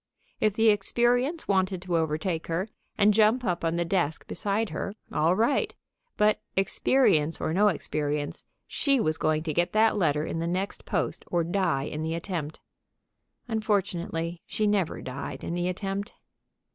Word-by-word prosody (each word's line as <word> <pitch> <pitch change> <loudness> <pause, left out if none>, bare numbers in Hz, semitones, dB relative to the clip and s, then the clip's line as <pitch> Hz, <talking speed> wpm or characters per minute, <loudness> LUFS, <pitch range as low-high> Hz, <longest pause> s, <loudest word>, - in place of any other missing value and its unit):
If 215 -2 +2
the 225 0 +5
experience 240 - +1
wanted 190 -1 +1
to 180 -2 -1
overtake 160 +1 -1
her, 170 +5 -1 0.3
and 210 +1 +5
jump 220 +4 +4
up 175 -3 -1
on 165 0 +1
the 170 0 0
desk 165 -4 0
beside 210 +1 -1
her, 200 - -4 0.2
all 165 +4 +3
right, 230 +7 +1 0.4
but, 210 0 +3
experience 190 - +2
or 160 - -1
no 205 +4 +4
experience, 150 -5 -2 0.2
she 275 -2 +1
was 155 -7 0
going 155 0 +1
to 160 -2 -2
get 175 +3 +1
that 220 0 +4
letter 150 -5 +1
in 165 - -3
the 165 - -1
next 185 +3 -3
post - - -2
or 175 -1 +1
die 170 -5 0
in 150 +1 -4
the 160 +1 -2
attempt. 165 -3 -4 0.9
Unfortunately, 180 -6 -1
she 215 - 0
never 200 -5 0
died 130 +1 -6
in - - -3
the 175 0 -1
attempt. 195 +2 -3
180 Hz, 160 wpm, -27 LUFS, 160-210 Hz, 0.9 s, the